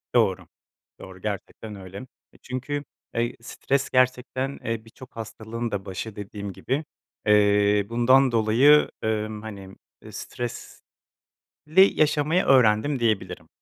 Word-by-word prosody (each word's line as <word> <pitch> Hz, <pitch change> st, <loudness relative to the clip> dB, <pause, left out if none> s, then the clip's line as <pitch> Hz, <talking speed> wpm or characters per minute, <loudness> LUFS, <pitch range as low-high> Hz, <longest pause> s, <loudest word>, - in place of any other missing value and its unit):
Doğru. -, -, +2 dB, 0.5 s
Doğru, 95 Hz, -1 st, -12 dB
gerçekten 105 Hz, +1 st, -6 dB
öyle. 95 Hz, 0 st, -10 dB, 0.4 s
E, -, -, -19 dB
çünkü, 135 Hz, +3 st, -4 dB, 0.3 s
eee, 120 Hz, +1 st, -1 dB
stres 135 Hz, +3 st, -2 dB
gerçekten, 130 Hz, +1 st, 0 dB
eee, 115 Hz, -1 st, -3 dB
birçok 125 Hz, +3 st, -15 dB
hastalığın 115 Hz, +1 st, -5 dB
da 100 Hz, -1 st, -3 dB
başı 100 Hz, +3 st, -6 dB
dediğim 100 Hz, -1 st, -7 dB
gibi, 135 Hz, -, -3 dB, 0.4 s
eee, 105 Hz, -1 st, +4 dB
bundan 130 Hz, +3 st, +4 dB
dolayı, 120 Hz, +7 st, +5 dB
emm, 110 Hz, -1 st, -2 dB
hani, 100 Hz, -3 st, -9 dB, 0.3 s
eee, -, -, -12 dB
stresli 120 Hz, -1 st, -8 dB, 1.0 s
yaşamayı 155 Hz, +3 st, +2 dB
öğrendim, 130 Hz, +2 st, +4 dB
diyebilirim. 110 Hz, -4 st, -1 dB
115 Hz, 115 wpm, -25 LUFS, 105-130 Hz, 1.0 s, dolayı